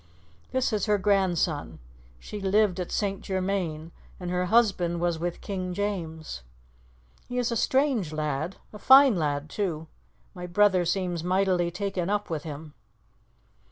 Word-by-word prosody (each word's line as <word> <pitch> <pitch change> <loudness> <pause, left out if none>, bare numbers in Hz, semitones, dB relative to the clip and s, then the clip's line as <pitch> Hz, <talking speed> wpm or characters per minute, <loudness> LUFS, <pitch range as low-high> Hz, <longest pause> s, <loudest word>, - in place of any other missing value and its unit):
"This 260 -3 0
is 210 0 0
her 210 0 +3
grandson. 185 -6 0 0.4
She 205 - -8
lived 195 -1 +2
at 180 - -4
St. 195 -2 -1
Germain, 185 -4 -2 0.3
and 180 -1 -4
her 180 0 0
husband 190 -5 +2
was 170 -1 0
with 175 +1 -3
King 185 -2 -4
James. 165 - -4 0.9
He 245 - -4
is 245 -1 0
a - - 0
strange 260 - +1
lad 155 +3 -2 0.2
a 210 - -9
fine 265 -1 +7
lad 145 -3 -1
too. 165 -3 -3 0.5
My 180 -2 -7
brother 190 -1 +3
seems 175 -1 -1
mightily 185 -1 +1
taken 185 0 -3
up 205 -3 -1
with 155 -2 -2
him." 150 0 -8
185 Hz, 145 wpm, -27 LUFS, 170-205 Hz, 0.9 s, fine